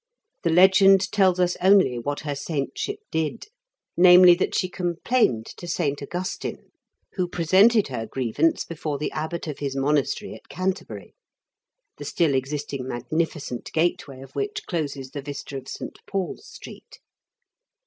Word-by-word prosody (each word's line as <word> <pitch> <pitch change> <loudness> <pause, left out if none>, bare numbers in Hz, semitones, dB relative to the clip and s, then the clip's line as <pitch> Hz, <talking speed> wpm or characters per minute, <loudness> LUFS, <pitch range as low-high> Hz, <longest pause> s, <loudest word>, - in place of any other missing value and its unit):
The 170 - 0
legend 190 +2 +5
tells 190 -3 +3
us 180 -1 +2
only 185 -10 +4
what 145 +4 -3
her 145 -1 -3
saintship 155 - -4
did, 160 +7 -2 0.5
namely, 180 0 +8
that 175 - -1
she 185 - +1
complained 175 - 0
to 175 - -9
St. 145 -5 -1
Augustine, 180 +6 -5 0.4
who 180 -2 -1
presented 190 +5 +4
her 115 -3 -4
grievance 135 +7 0
before 150 -3 -4
the 150 - -3
abbot 160 +2 -4
of 150 -3 -6
his 140 -2 -3
monastery 140 +7 0
at - - -14
Canterbury, 185 +1 -4 0.8
the - - -8
still 165 -5 +1
existing 135 0 -3
magnificent 130 +1 -3
gateway 155 -5 -1
of 135 - -12
which 415 0 -4
closes 140 -6 -4
the 145 - -5
vista 140 0 -7
of 135 -1 -7
St. - - -7
Paul's 195 -3 -4
Street. - - -12
160 Hz, 140 wpm, -24 LUFS, 140-185 Hz, 0.8 s, namely